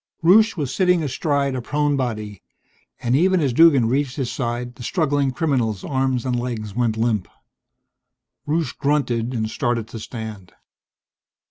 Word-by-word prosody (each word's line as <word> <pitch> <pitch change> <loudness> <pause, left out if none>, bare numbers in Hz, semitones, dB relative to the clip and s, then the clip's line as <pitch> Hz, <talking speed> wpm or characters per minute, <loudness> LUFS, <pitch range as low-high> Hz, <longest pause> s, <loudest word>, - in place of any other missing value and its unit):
Rusche 215 +5 +5
was 145 -5 -2
sitting 180 -3 +2
astride 140 0 0
a 130 - -3
prone 145 +3 0
body, 110 -7 -3 0.6
and 120 +1 +2
even 185 +5 +3
as 140 -6 +1
Duggan 140 -5 +6
reached 135 +1 0
his 130 -5 -2
side 120 -1 -3
the 125 - -14
struggling 145 0 0
criminal's 125 - -1
arms 130 -3 -1
and 125 -2 0
legs 115 -4 -4
went 115 -2 0
limp. 110 -4 0 1.2
Rusche 155 -3 0
grunted 125 -5 0
and 110 -1 -1
started 115 0 -2
to 115 - -7
stand. 110 -5 -8
130 Hz, 145 wpm, -22 LUFS, 115-145 Hz, 1.2 s, Duggan